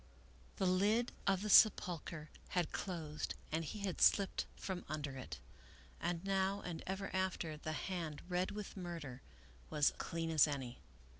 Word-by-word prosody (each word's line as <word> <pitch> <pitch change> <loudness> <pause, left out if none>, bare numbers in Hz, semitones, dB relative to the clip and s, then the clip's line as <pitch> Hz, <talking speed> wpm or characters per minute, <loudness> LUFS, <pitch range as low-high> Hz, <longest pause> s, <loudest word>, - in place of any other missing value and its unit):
The 190 - 0
lid 205 +6 +3 0.2
of 195 -1 +3
the 210 - -2
sepulcher 170 -8 +5 0.2
had 180 -3 0
closed 160 -5 -3 0.2
and 160 +1 0
he 205 +7 -5
had 195 -3 -2
slipped 200 -2 +4
from 185 -2 -4
under 145 -3 -3
it. 125 - -6 0.6
And 175 +1 -2
now, 195 +1 +1
and 170 -2 -5
ever 190 +1 -3
after, 185 -4 0
the 155 +1 -4
hand 165 -3 -3
red 180 0 +1
with 210 -1 -6
murder 165 -9 -6 0.5
was 150 -1 +3
clean 165 0 -2
as 155 -1 +6
any. 135 -4 -4
175 Hz, 150 wpm, -37 LUFS, 155-190 Hz, 0.6 s, as